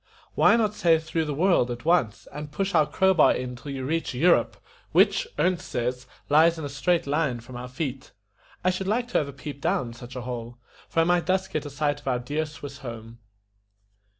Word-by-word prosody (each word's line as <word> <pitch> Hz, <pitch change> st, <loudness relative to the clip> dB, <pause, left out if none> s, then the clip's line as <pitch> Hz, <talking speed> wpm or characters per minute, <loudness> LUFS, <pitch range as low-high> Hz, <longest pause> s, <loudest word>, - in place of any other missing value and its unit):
"Why -, -, +5 dB
not 215 Hz, -3 st, +1 dB
say 170 Hz, -5 st, +4 dB
through 160 Hz, 0 st, -2 dB
the 150 Hz, -, -2 dB
world 170 Hz, -6 st, +3 dB
at 120 Hz, +3 st, -6 dB
once, 130 Hz, -11 st, +1 dB
and 150 Hz, 0 st, -7 dB
push 195 Hz, +5 st, -2 dB
your 150 Hz, -, +4 dB
crow 190 Hz, +5 st, +3 dB
bar 170 Hz, -, +5 dB
in 125 Hz, 0 st, -4 dB
till 125 Hz, +4 st, -10 dB
you 135 Hz, -1 st, -4 dB
reach 160 Hz, -2 st, -2 dB
EU 170 Hz, +8 st, +5 dB
ROPE, -, -, +2 dB, 0.4 s
which, -, -, +4 dB
Ernest 180 Hz, -1 st, +1 dB
says, 125 Hz, +1 st, -2 dB, 0.2 s
lies 160 Hz, +3 st, +5 dB
in 160 Hz, -, -5 dB
a -, -, -4 dB
straight 170 Hz, +5 st, +1 dB
line 140 Hz, -4 st, 0 dB
from 120 Hz, +2 st, -12 dB
our 125 Hz, +1 st, -6 dB
feet. 130 Hz, 0 st, -5 dB, 0.5 s
I 185 Hz, -, +3 dB
should 185 Hz, +1 st, -4 dB
like 240 Hz, +4 st, 0 dB
to -, -, +2 dB
have 145 Hz, -, -2 dB
a -, -, -6 dB
peep 140 Hz, +1 st, -8 dB
down, 120 Hz, -2 st, 0 dB
such 120 Hz, +2 st, -11 dB
a 125 Hz, -, -4 dB
hole, 120 Hz, -1 st, -6 dB, 0.3 s
for 165 Hz, -, +2 dB
I -, -, +4 dB
might 175 Hz, -1 st, +2 dB
thus 190 Hz, 0 st, +1 dB
get 155 Hz, -4 st, -3 dB
a -, -, -6 dB
sight 145 Hz, +1 st, -1 dB
of 145 Hz, -, -16 dB
our 125 Hz, -2 st, +2 dB
dear 145 Hz, +6 st, -2 dB
Swiss 145 Hz, -2 st, -9 dB
home." 115 Hz, -2 st, -9 dB
145 Hz, 225 wpm, -26 LUFS, 125-170 Hz, 0.5 s, Why